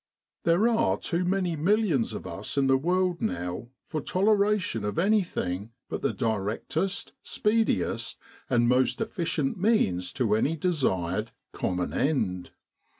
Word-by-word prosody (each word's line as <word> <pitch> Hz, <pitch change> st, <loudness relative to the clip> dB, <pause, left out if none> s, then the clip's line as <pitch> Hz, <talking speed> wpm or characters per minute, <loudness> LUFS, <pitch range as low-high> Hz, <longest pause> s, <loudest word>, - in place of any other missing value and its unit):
There 170 Hz, +7 st, +4 dB
are 230 Hz, -1 st, +2 dB
too 175 Hz, 0 st, -1 dB
many 180 Hz, -2 st, 0 dB
millions 170 Hz, -, +2 dB
of -, -, -6 dB
us -, -, -5 dB
in 140 Hz, -, +3 dB
the 135 Hz, 0 st, +4 dB
world 180 Hz, +4 st, +1 dB
now 90 Hz, +1 st, -3 dB, 0.2 s
for 155 Hz, -, -3 dB
toleration 200 Hz, -, +1 dB
of 105 Hz, +6 st, -3 dB
anything 165 Hz, -, 0 dB, 0.2 s
but -, -, -4 dB
the -, -, +1 dB
directest, 110 Hz, -, -2 dB
speediest, 215 Hz, -, 0 dB, 0.3 s
most 125 Hz, +2 st, +3 dB
efficient 170 Hz, -9 st, -1 dB
means 95 Hz, -, +2 dB
to 115 Hz, -6 st, +1 dB
any 145 Hz, +9 st, +1 dB
desired, 105 Hz, -, 0 dB, 0.2 s
common 90 Hz, 0 st, -2 dB
end. 95 Hz, -, 0 dB
150 Hz, 125 wpm, -27 LUFS, -, 0.3 s, There